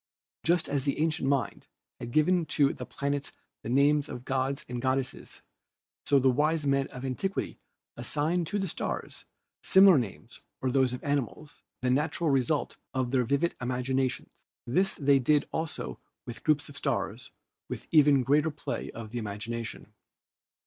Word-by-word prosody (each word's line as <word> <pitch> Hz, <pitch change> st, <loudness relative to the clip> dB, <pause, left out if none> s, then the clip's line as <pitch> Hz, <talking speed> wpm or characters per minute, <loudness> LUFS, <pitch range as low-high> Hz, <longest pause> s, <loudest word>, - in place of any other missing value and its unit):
Just 170 Hz, 0 st, +2 dB
as 140 Hz, -2 st, -1 dB
the 140 Hz, -1 st, -1 dB
ancient 155 Hz, -3 st, +1 dB
mind 140 Hz, -1 st, -1 dB, 0.3 s
had 120 Hz, -, -6 dB
given 160 Hz, +5 st, +2 dB
to 140 Hz, -2 st, +3 dB
the 125 Hz, -, -8 dB
planets 140 Hz, 0 st, -3 dB, 0.3 s
the -, -, -6 dB
names 145 Hz, +3 st, +3 dB
of 125 Hz, -, -7 dB
gods 135 Hz, +1 st, -1 dB
and 125 Hz, -1 st, -4 dB
goddesses, 130 Hz, 0 st, -2 dB, 0.6 s
so 140 Hz, -, +5 dB
the 135 Hz, 0 st, +3 dB
wise 150 Hz, +3 st, +1 dB
men 140 Hz, -1 st, +2 dB
of 125 Hz, +1 st, -8 dB
antiquity 190 Hz, +10 st, -3 dB, 0.4 s
assigned 155 Hz, +7 st, -1 dB
to 205 Hz, -, -1 dB
the 195 Hz, -1 st, -1 dB
stars -, -, -4 dB, 0.4 s
similar 190 Hz, -5 st, +7 dB
names 95 Hz, -10 st, -7 dB, 0.2 s
or 130 Hz, -, -1 dB
those 130 Hz, -1 st, +3 dB
of 125 Hz, -, -6 dB
animals, 145 Hz, +1 st, -3 dB, 0.2 s
the 125 Hz, -, +2 dB
natural 150 Hz, +3 st, +1 dB
result 135 Hz, +3 st, 0 dB, 0.2 s
of 130 Hz, -2 st, 0 dB
their 130 Hz, -2 st, +2 dB
vivid 140 Hz, +7 st, +1 dB
imagina 130 Hz, +1 st, 0 dB
tion. -, -, -8 dB, 0.3 s
This 185 Hz, +11 st, +1 dB
they 140 Hz, -1 st, +4 dB
did 145 Hz, +3 st, +2 dB
also 160 Hz, -1 st, -4 dB, 0.3 s
with 120 Hz, -, -8 dB
groups 155 Hz, -1 st, +2 dB
of 145 Hz, -, -12 dB
stars -, -, -2 dB, 0.4 s
with -, -, -6 dB
even 145 Hz, -4 st, +6 dB
greater 150 Hz, +4 st, +3 dB
play 150 Hz, -1 st, -5 dB
of 110 Hz, -2 st, -8 dB
the 120 Hz, -, -3 dB
imagination. 110 Hz, +1 st, -5 dB
140 Hz, 160 wpm, -29 LUFS, 125-150 Hz, 0.6 s, similar